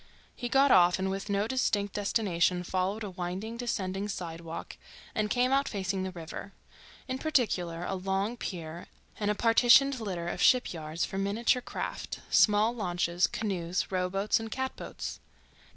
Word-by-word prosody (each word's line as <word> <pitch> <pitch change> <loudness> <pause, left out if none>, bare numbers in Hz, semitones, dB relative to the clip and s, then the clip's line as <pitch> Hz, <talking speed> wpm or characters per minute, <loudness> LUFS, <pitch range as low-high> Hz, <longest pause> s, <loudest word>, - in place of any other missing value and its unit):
He 245 - -4
got 270 +2 +5
off 175 -1 +6
and 190 0 -1
with 195 +1 -4
no 200 +1 +1
distinct 205 -5 0
destination 185 -4 +1
followed 190 +4 -1
a 205 - -5
winding, 185 +5 -4
descending 200 -5 -2
sidewalk 165 -4 -6 0.4
and 215 -1 0
came 250 +3 +2
out 275 +1 +2
facing 190 -2 -2
the 190 - -2
river, 175 +3 -8 0.5
in 260 0 -3
particular 190 - 0
a - - -2
long 195 +4 -1
pier 170 -6 -6 0.3
and 205 -1 0
a 210 - +2
partitioned 245 +4 +5
litter 185 -6 -4
of - - -3
shipyards 165 -10 +2
for 195 - -4
miniature 225 +6 +1
craft: - - -5
small 210 +2 +5
launches, 175 -4 +1
canoes, 185 -5 -2
rowboats, 190 +3 +1
and 225 0 -6
catboats. 260 +3 -5
195 Hz, 150 wpm, -30 LUFS, 180-225 Hz, 0.5 s, off